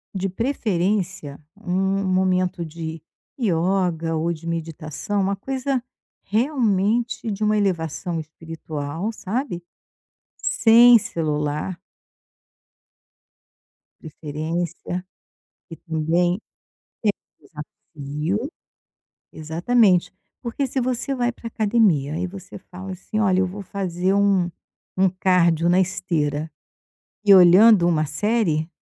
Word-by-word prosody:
de 195 0 -1
preferência 190 - -1 0.2
um 190 -1 -1
um - - -3
momento 185 -1 +1
de 160 0 -7 0.4
yoga 175 -4 0
ou 165 +2 0
de 165 +1 -10
meditação, 165 +4 -3
uma 195 +1 0
coisa 265 +4 -2 0.4
realmente 225 -1 0
de 205 +1 -3
uma 215 0 +2
elevação 175 -3 -1
espiritual, 160 +2 -6
sabe. 215 -3 -4 0.7
Sem 235 +1 +6
celular. 150 0 -2 2.2
Preferência. 160 +3 -4 0.7
Porque 165 - -11
também 170 +3 +1 1.0
é - - -27
um - - -16 0.6
desafio. 170 - -2 0.8
Exatamente. 180 +3 +2 0.3
Porque 245 +3 -2
se 260 +1 -2
você 255 +2 -1
vai 245 -2 0
pra 235 - -12
academia, 205 -11 +2
aí 180 +3 -2
você 185 0 -10
fala 185 +1 -9
assim: 190 +3 -5
“Olha, 190 -3 +3
eu 190 - +2
vou 195 +3 -7
fazer 185 -1 -1
um 200 -3 +2 0.5
um 190 - +5
cardio 175 -3 +2
na 175 +1 +4
esteira 160 -5 -1 0.7
e 200 -1 +8
olhando 185 +1 +7
uma 155 -3 +2
série”. 165 -2 0
185 Hz, 105 wpm, -22 LUFS, 165-210 Hz, 2.2 s, e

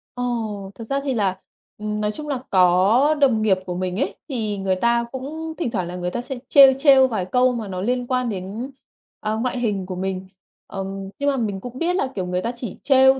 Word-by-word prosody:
Ồ, 220 -5 -3
thật 230 - -8
ra 275 - 0
thì 275 - -1
là, 195 -5 0 0.4
ừm, 210 0 -3
nói 210 - 0
chung 300 +7 -7
là 275 -4 -1
có 190 +10 +4
đồng 245 -6 +4
nghiệp 200 -3 +3
của 180 - -4
mình 185 0 -2
ấy, 275 - -1
thì 215 -6 -2
người 190 -1 0
ta 235 +4 +2
cũng 315 +5 -5
thỉnh 275 -10 -2
thoảng 185 -5 -2
là 180 - -6
người 180 0 -3
ta 240 - -2
sẽ 260 0 -6
trêu, 275 -2 +9
trêu 270 -2 +6
vài 215 -7 -2
câu 250 +6 +3
mà 225 -4 -4
nó 185 -1 -4
liên 245 +3 -1
quan 255 -2 0
đến, 205 +7 -5 0.5
à, 215 0 -1
ngoại 245 +3 -1
hình 205 -5 -1
của 185 0 -5
mình. 190 0 -3 0.4
Ừm, 195 0 -5
nhưng 285 0 +2
mà 275 - 0
mình 205 -5 -2
cũng 245 +3 -8
biết 355 +2 +1
là, 275 - +1
kiểu, 185 - -2
người 180 0 -1
ta 230 +5 -2
chỉ 240 -4 -6
trêu 265 -1 +5
225 Hz, 230 wpm, -22 LUFS, 195-260 Hz, 0.5 s, trêu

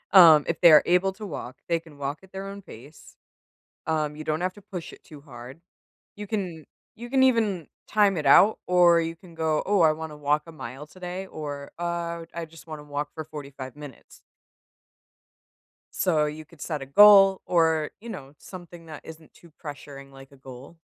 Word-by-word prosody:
Um, 160 -5 +9
if 170 - -3
they 170 - +8
are 150 - +8
able 180 +2 +2
to 210 +2 -9
walk, 145 -8 -7
they 170 -1 +1
can 160 -3 -17
walk 140 +1 -4
at 190 -1 -19
their 195 0 -7
own 200 0 -8
pace. 140 -1 -15 0.7
Um, 155 -2 -1
you 155 - -8
don't 155 +2 -2
have 185 +1 -2
to 205 - -14
push 180 -3 -8
it - - -16
too 150 -3 -14
hard. 130 +1 -12 0.5
You 210 - -7
can 185 -7 -4 0.3
you 240 +2 -9
can 265 - +3
even 220 -9 +1 0.2
time 205 -3 +2
it 150 - -3
out 200 +10 +6
or 175 -2 +5
you 165 0 -4
can 170 0 -17
go, 160 -1 0
"Oh, 200 -2 +3
I 160 -2 +6
wanna 155 -1 -8
walk 150 +1 0
a - - -10
mile 135 0 -9
today," 185 +2 -7
or 145 -4 -7
"Uh, 170 -1 -3
I 170 0 -5
just 160 0 -16
wanna 155 -2 -8
walk 145 0 -4
for 160 - -6
45 140 -4 -9
minutes." 145 -4 -13 1.7
So, 160 -5 +1
you 155 +1 -6
could 155 -1 -19
set 150 -4 -4
a - - -6
goal 195 +5 +7
or, 160 -3 +1
you 235 - -9
know, 140 -9 -9
something 175 -2 -12
that 155 -2 -9
isn't 160 -1 -13
too 170 - -19
pressuring 140 -2 -9
like 135 0 -15
a 140 - -18
goal. 130 +4 -13
160 Hz, 195 wpm, -25 LUFS, 145-180 Hz, 1.7 s, Um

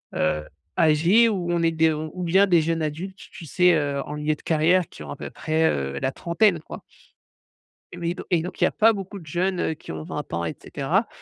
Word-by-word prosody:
heu, 75 -1 0 0.4
âgés, 170 +9 +5
ou 180 -5 -2
on 170 -1 +1
est 165 - +3
des 160 0 +3
ou 155 +4 -5
bien 190 +4 +4
des 175 -4 +4
jeunes 165 +1 -1
adultes, 170 +6 -4
tu 175 - -10
sais, 180 +3 +4
heu, 145 -2 -1
en 150 - -6
milieu 150 +1 0
de - - -20
carrière 165 +2 +2
qui - - -11
ont 75 - -10
à - - -5
peu - - -6
près, 160 +1 0
heu, 70 0 -2
la 130 - 0
trentaine, 175 +3 +2
quoi - - -9 1.1
Oui, 175 0 -3
donc - - -8
et 170 - +3
donc 180 +3 -7
il - - +2
y - - +4
a - - -2
pas 225 +1 +4
beaucoup 200 -1 -6
de 170 - -12
jeunes 175 +1 -1
qui 80 - -9
ont 80 - -6
20 - - -6
ans 85 0 -1
et 80 - -3
cetera - - -1
165 Hz, 235 wpm, -24 LUFS, 150-180 Hz, 1.1 s, âgés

